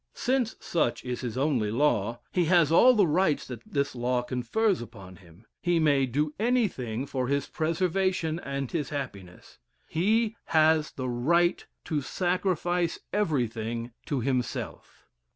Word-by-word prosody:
Since 255 -3 0
such 145 -9 -1
is 125 -1 -3
his 120 -1 -4
only 130 -6 +1
law, 120 -2 +1
he 180 -2 +1
has 165 -2 +4
all 250 +9 +7
the 205 -3 +5
rights 160 -1 +1
that 125 -3 -8
this 140 -1 0
law 125 0 0
confers 130 - 0
upon 100 -6 -11
him; 90 +3 -19 0.2
he 175 -1 +2
may 140 -4 +3
do 150 +4 -1
anything 185 - 0
for 130 -3 -2
his 140 +1 0
preservation 170 0 0
and 140 -4 -4
his 155 -4 -2
happiness; 100 -11 -7 0.3
he 220 +6 +1
has 155 -1 +3
the 130 -1 -5
right 170 +9 +2 0.2
to 155 -3 -1
sacrifice 175 +1 0 0.2
everything 120 - -1 0.2
to 140 -5 -1
himself. 125 -1 -3
145 Hz, 140 wpm, -27 LUFS, 125-175 Hz, 0.3 s, all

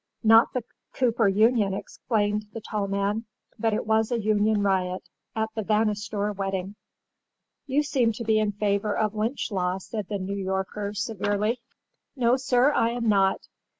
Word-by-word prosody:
"Not 225 +1 +6
the 250 - -2 0.3
Cooper 235 -4 +2
Union," 210 0 +3
explained 210 +1 -2
the 225 - -5
tall 210 -2 -3
man—"but 210 +2 -3
it 215 - -1
was 220 +1 +2
a 240 - +1
union 210 -1 +2
riot—at 190 +3 -2
the 220 - -2
Vanastor 210 -1 0
wedding." 195 0 -3 0.9
"You 280 +2 +2
seem 255 -6 +1
to 230 - -6
be 220 -1 +2
in 210 -1 0
favor 205 0 0
of 215 -1 0
lynch 220 +4 -2
law," 180 -1 0
said 205 +1 -6
the 205 - -1
New 195 +1 -4
Yorker, 195 +1 -3
severely. 210 +1 -1 0.6
"No, 245 -2 +3
sir, 260 +1 +3
I 230 - +2
am 235 -1 -2
not. 195 -2 +3
210 Hz, 150 wpm, -26 LUFS, 200-225 Hz, 0.9 s, Not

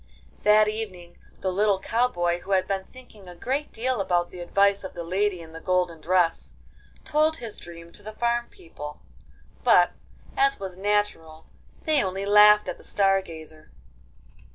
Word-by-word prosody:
That 210 0 +5
evening 195 -5 -6 0.2
the 190 - -1
little 200 +1 +2
cow 235 +5 +1
boy, 175 -6 -1
who 195 +3 -4
had 185 -1 +2
been 195 -1 -2
thinking 215 -7 -14
a 175 - -11
great 270 +10 -3
deal 245 -1 -1
about 175 -2 0
the 180 - -10
advice 200 +3 +2
of 190 - -8
the 170 - -5
lady 185 +1 -1
in 160 -1 -12
the 165 - -8
golden 180 -2 -1
dress, 175 0 +1 0.5
told 315 +1 +2
his 230 -3 -7
dream 170 0 -11
to 205 - -13
the 215 +1 -8
farm 235 +2 -1
people. 150 -3 -10 0.6
But, - - +5 0.4
as 410 0 +2
was 190 -2 -6
natural, 195 -5 -1 0.4
they 310 -3 +2
only 190 +1 -3
laughed 210 +1 +6
at - - -5
the - - -15
Star 195 -1 +2
Gazer. 155 -3 -12
195 Hz, 170 wpm, -25 LUFS, 175-215 Hz, 0.6 s, laughed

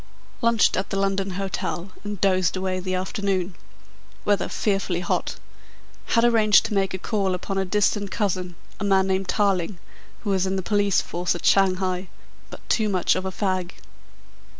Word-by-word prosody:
"Lunched 230 -2 +3
at 190 - -2
the 195 - -2
London 195 0 0
Hotel 190 -1 -3
and 205 -2 -5
dozed 185 -2 +2
away 185 0 -1
the 185 0 -2
afternoon. 190 -1 -1 0.7
Weather 205 -1 +1
fearfully 195 -4 -1
hot. - - -1 0.8
Had 230 - +5
arranged 220 -3 +5
to - - -3
make 195 -2 +1
a - - -3
call 195 -2 -1
upon 195 +2 -3
a 190 - 0
distant 205 +1 +1
cousin 185 -5 -2 0.2
a - - -3
man 195 -1 +3
named 190 0 0
Tarling 195 -3 +1 0.5
who 205 -2 0
is 190 0 +1
in 190 - -1
the 190 - -2
police 205 0 +2
force 175 0 -2
at 175 - -6
Shanghai, 185 -1 +2 0.4
but - - -12
too 215 -2 +1
much 185 -3 +2
of 185 - -3
a 190 - -2
fag. 185 -2 -2
195 Hz, 170 wpm, -24 LUFS, 185-205 Hz, 0.8 s, Had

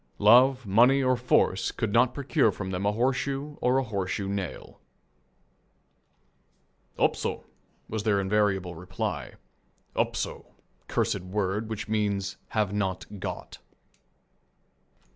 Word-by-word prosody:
Love, 125 +4 +6
money, 120 +7 +5
or 130 0 +3
force 120 -6 +2
could 110 -4 -3
not 125 +1 +4
procure 140 -4 +2
from 95 -1 -5
them 95 +2 -1
a - - +3
horseshoe 135 +5 -1
or 125 +1 +3
a 135 - +2
horseshoe 100 -3 -3
nail. 100 -3 -5 2.2
"Upso," - - 0 0.4
was 110 -1 -3
their 105 -2 +2
invariable 95 -2 +1
reply. 90 +2 -4 0.6
"Upso," - - -2 0.3
cursed - - 0
word, 100 +3 -2
which 110 0 -4
means 100 -3 -1
"Have 105 -3 0
not 100 0 -3
got." - - -6
105 Hz, 110 wpm, -27 LUFS, 95-125 Hz, 2.2 s, Love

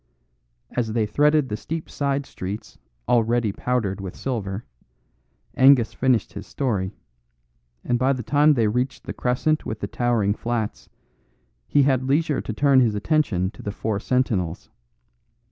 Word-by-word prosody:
As 115 -3 -2
they 110 -2 +1
threaded 150 +5 +3
the 105 - -2
steep 160 +8 -5
side 140 -1 -1
streets 100 - -7 0.3
already 120 -2 +2
powdered 105 -4 -2
with 95 -2 -6
silver, 105 -6 -4 0.9
Angus 130 -4 +5
finished 125 -5 +1
his 100 +1 -8
story; 105 -8 -2 0.9
and 120 -1 0
by 130 +2 +3
the 130 -3 -2
time 145 +4 +4
they 115 -4 +2
reached 125 +5 -1
the - - -6
crescent 140 +5 0
with 110 0 -5
the - - -3
towering 115 -3 +1
flats, 115 -1 -3 0.8
he 145 - +4
had 130 -1 +1
leisure 150 +1 +1
to - - -5
turn 140 +3 +4
his 115 -4 +2
attention 105 - +1
to - - -13
the 100 - -4
four 105 0 -2
sentinels. 105 -9 -1
120 Hz, 145 wpm, -23 LUFS, 105-135 Hz, 0.9 s, Angus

